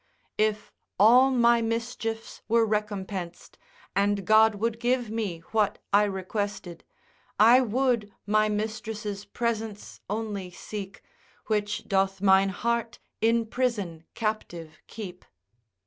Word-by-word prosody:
If 215 -1 0 0.3
all 245 +6 +7
my 235 -2 +4
mischiefs 225 0 -3
were 230 +1 +4
recompensed 200 -4 -4 0.4
And 200 0 +1
God 220 +1 +5
would 225 +2 -2
give 245 -1 0
we 200 -7 -3
what 215 -2 +1 0.2
I 205 +1 +6
requested, 195 -2 -4 0.6
I 235 +5 +7
would 240 -3 0
my 215 +1 +2
mistress' 210 -1 -4
presence 220 -1 -4
only 205 -3 -3
seek, 195 +2 -8 0.4
Which 210 -1 -1
doth 195 -1 +1
mine 195 0 +5
heart 235 +3 -2 0.2
in 230 +1 +3
prison 215 -9 -2
captive 175 -8 -4
keep. 190 -5 -8
215 Hz, 110 wpm, -27 LUFS, 200-230 Hz, 0.6 s, all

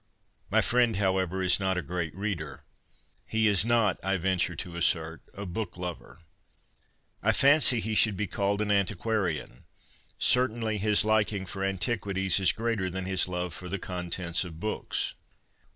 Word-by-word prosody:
My - - +4
friend, 120 -2 +2
however, 95 -1 0
is 90 +1 +4
not 95 -1 0
a 90 - -2
great 85 -3 -4
reader. 95 -7 -4 0.6
He 110 0 +1
is 100 -3 +3
not, 115 -4 +2
I 95 0 +1
venture 90 -1 0
to 85 +1 -6
assert, 80 -1 0
a 100 - -6
book 100 +2 -5
lover. 90 -1 -7 1.0
I - - +3
fancy 140 -3 +4
he 110 0 -2
should 110 -2 +3
be 105 - -1
called 100 +1 -1
an 105 - -1
antiquarian. 100 - -1 0.5
Certainly 115 -3 +2
his 105 +1 +3
liking 110 -2 +1
for 95 +1 -5
antiquities 95 -1 +1
is 95 -3 +3
greater 115 -5 -1
than 95 +1 -4
his 95 -2 +2
love 90 -2 -3
for 90 +4 -7
the 100 - -2
contents 90 -1 -1
of 80 -3 -9
books. 110 +3 -2
95 Hz, 155 wpm, -28 LUFS, 90-110 Hz, 1.0 s, My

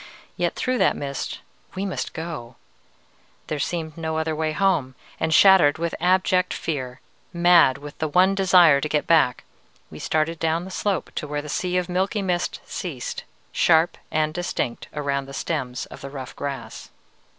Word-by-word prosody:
Yet - - -1
through 255 -1 -1
that - - +3
mist 140 -1 -5 0.3
we 190 +1 -2
must 190 - -4
go! 160 -8 -6 0.9
there 155 - -3
seemed 160 0 -3
no 160 -1 -3
other 160 0 -1
way 155 0 -1
home, 155 -7 +1 0.2
and, 160 - 0
shattered 175 -4 +6
with 170 +1 -2
abject 185 +1 +2
fear, 130 -6 -4 0.3
mad 170 -6 +5
with 145 0 -11
the 155 - 0
one 185 +5 +4
desire 180 -7 +5
to 150 - -2
get 150 -1 0
back, 155 -7 +3 0.5
we - - -9
started 155 +1 -1
down 165 +2 0
the 190 - -9
slope 195 -2 -2
to 150 - -4
where 145 0 -3
the 150 - -8
sea 180 +4 -1
of 180 -1 0
milky 190 +3 -1
mist 180 -2 -1
ceased, 145 -9 -5 0.3
sharp 165 0 +3
and 155 0 0
distinct 155 -8 -3
around 140 -2 -2
the 135 - -8
stems 130 -7 -3
of - - -12
the 140 - -7
rough 135 -2 -8
grass. 140 -1 -6
160 Hz, 170 wpm, -23 LUFS, 145-180 Hz, 0.9 s, shattered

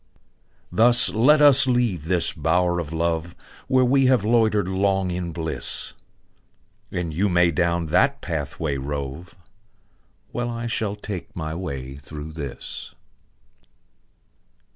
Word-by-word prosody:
Thus 120 -3 +5
let 150 +8 +4
us 140 -2 +7
leave 120 - 0
the 85 0 +2
bower 85 +3 +1
of 80 -3 -5
love, 85 +1 -2 0.3
Where 130 -1 +3
we 135 +1 +3
have 125 -6 +2
loitered 110 -4 +2
long 95 -1 0
in 90 -1 -4
bliss; 80 -1 -3 1.0
And 90 -3 -3
you 100 +6 +1
may 90 -1 +3
down 85 0 0
that 140 +9 +3
pathway 75 -2 -3
rove, 70 +4 -6 1.0
While 120 0 -3
I 115 0 -5
shall 110 -3 -2
take 105 -3 -8
my 80 -2 -4
way 70 -6 -6
through 75 +2 -9
this. 75 -5 -7
90 Hz, 120 wpm, -23 LUFS, 80-115 Hz, 1.0 s, us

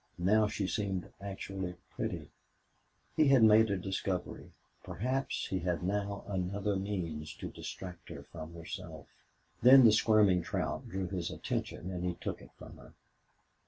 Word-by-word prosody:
Now 105 +5 +4
she 105 -1 -2
seemed 95 -2 -2
actually 95 -2 -5 0.2
pretty. - - -4 0.8
He 155 -2 +5
had 135 -4 +6
made 110 0 +7
a 100 - +1
discovery 95 0 -3 0.3
perhaps 130 +6 -2
he 95 - 0
had 90 0 -1
now 100 +1 -2
another 100 +1 -1
means 90 -6 -3
to - - -6
distract 90 -3 -8
her - - -8
from 80 0 -9
herself. 85 -2 -7 0.6
Then 130 +1 +9
the 110 - +8
squirming 105 -4 +4
trout - - -3
drew 95 0 -2
his 90 -2 -3
attention 90 - -4
and 90 -1 -4
he 90 -1 -1
took - - -5
it - - -13
from - - -11
her. - - -15
95 Hz, 150 wpm, -32 LUFS, 90-105 Hz, 0.8 s, Then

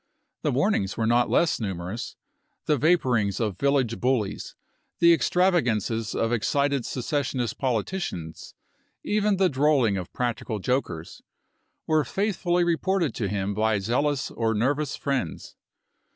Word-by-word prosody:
The - - 0
warnings 95 0 0
were 115 - 0
not 120 +2 +3
less 170 - +2
numerous; 95 +1 -5 0.5
the 150 - +3
vaporings 125 - +2
of 105 -5 -2
village 135 -5 +1
bullies, 125 -6 -1 0.4
the 170 0 +6
extravagances 120 - +1
of 115 +1 0
excited 140 +3 0
secessionist 130 -2 -2
politicians, 115 - -3 0.5
even 210 -1 +1
the 190 0 +4
drolling 135 - +2
of 90 -2 -6
practical 120 -3 -2
jokers, 95 - -3 0.6
were 155 -1 +2
faithfully 180 - 0
reported 175 - 0
to 110 - -2
him 100 0 -2
by 110 +1 +1
zealous 125 +8 0
or 110 -1 -1
nervous 140 +6 0
friends. 135 - -3
125 Hz, 125 wpm, -25 LUFS, 110-155 Hz, 0.6 s, the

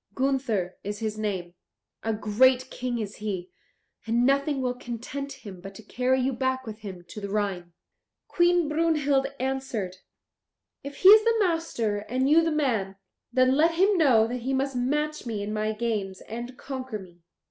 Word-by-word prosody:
Gunther 255 -9 -1
is 205 +1 -4
his 215 0 -3
name; 190 -5 -3 0.5
a 225 - -1
great 250 +5 +3
King 250 -1 -3
is 210 -3 -5
he, 195 -4 -4 0.6
and 235 +2 +2
nothing 280 +1 +2
will 250 -1 0
content 250 +3 -6
him 190 -4 -11
but 195 +1 -9
to 220 - -11
carry 255 +4 +1
you 265 +1 0
back 260 +1 -1
with 215 -1 -7
him 190 -5 -8
to 210 - -8
the 200 - -5
Rhine." 195 -4 -2 0.5
Queen 350 -2 +3
Brunhild 300 -3 +2
answered, 255 -8 -3 0.9
"If 280 0 -7
he 375 - +9
is 430 +1 +9
the 460 0 +3
master 325 - 0
and 255 +5 -1
you 310 +3 +6
the 325 - +1
man, 230 -11 0 0.4
then 255 +1 +4
let 330 +3 +3
him 390 +4 +4
know 260 -10 +5
that 245 +2 -3
he 260 +3 -2
must 270 0 -1
match 300 +3 -1
me 215 -3 -3
in 210 +1 -4
my 215 0 0
games 215 -4 -3
and 240 +3 -7
conquer 260 -4 -5
me. 180 -3 -14
250 Hz, 175 wpm, -26 LUFS, 210-275 Hz, 0.9 s, he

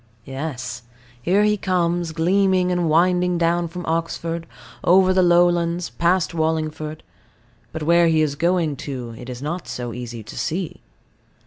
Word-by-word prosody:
Yes. 135 -4 -5 0.4
Here 190 +8 +3
he 210 0 +2
comes, 175 -3 0
gleaming 180 +2 +2
and 175 -2 +1
winding 180 +2 +3
down 170 0 +1
from 175 +1 -7
Oxford, 165 0 -2 0.4
over 185 +1 +5
the 185 - +4
lowlands, 175 -1 +3
past 175 0 +1
Wallingford; 155 -1 -2 0.7
but 160 -1 -5
where 170 +2 +4
he 160 -1 +3
is 150 -2 0
going 170 -2 0
to 125 -5 -6
it 125 +2 -10
is 125 +1 -7
not 165 +3 -4
so 120 -2 -5
easy 120 -2 -7
to 105 - -11
see. 170 +1 -3
170 Hz, 145 wpm, -22 LUFS, 155-180 Hz, 0.7 s, over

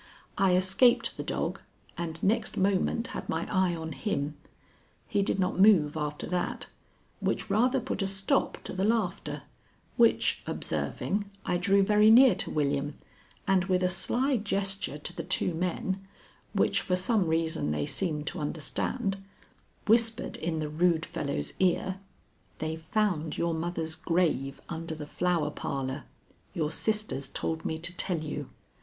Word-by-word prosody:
I 190 -2 +3
escaped 190 +7 +4
the - - -5
dog, - - -2 0.4
and 165 -1 -5
next 215 +4 +1
moment 200 +5 +1
had - - -6
my 160 +1 -1
eye 185 -2 +2
on 160 -1 -5
him. 140 +1 -2 0.7
He 205 -3 +1
did 195 - +1
not 185 0 0
move 185 -8 +6
after 150 -1 -3
that, 180 -1 -2 0.5
which 215 - -1
rather 250 +6 +3
put 245 - -3
a 195 - +1
stop 195 0 +1
to - - -6
the 190 +1 -1
laughter, 210 -4 -1 0.5
which 235 -2 +4
observing, 200 0 -2 0.2
I 175 - +1
drew 195 +3 +3
very 210 +2 +5
near 250 +3 +8
to - - -1
William, 145 0 0 0.5
and 190 -1 +3
with 185 -1 +1
a 180 - +3
sly 250 +8 +1
gesture 195 - -1
to 160 +4 -7
the 170 - -3
two 180 - +1
men, 185 +3 -2 0.5
which - - +2
for 180 - 0
some 185 +1 +2
reason 160 - 0
they 75 -1 -1
seemed 150 - -1
to - - -7
understand, 195 - -2 0.6
whispered 230 +2 +2
in 160 0 -2
the 155 -1 -2
rude 165 +1 +2
fellow's 75 +1 -3
ear: 190 +1 +1 0.6
"They've 160 +1 -4
found 165 -3 0
your 170 0 0
mother's 160 -1 -2
grave 165 -5 0
under 165 -1 -5
the 150 -1 -7
Flower 165 -1 0
Parlor. 135 -1 -4 0.5
Your 155 -3 0
sisters 215 -8 0
told 160 0 -3
me 160 - -1
to 175 +2 -2
tell 180 -1 0
you. 150 -2 -5
180 Hz, 150 wpm, -29 LUFS, 160-195 Hz, 0.7 s, near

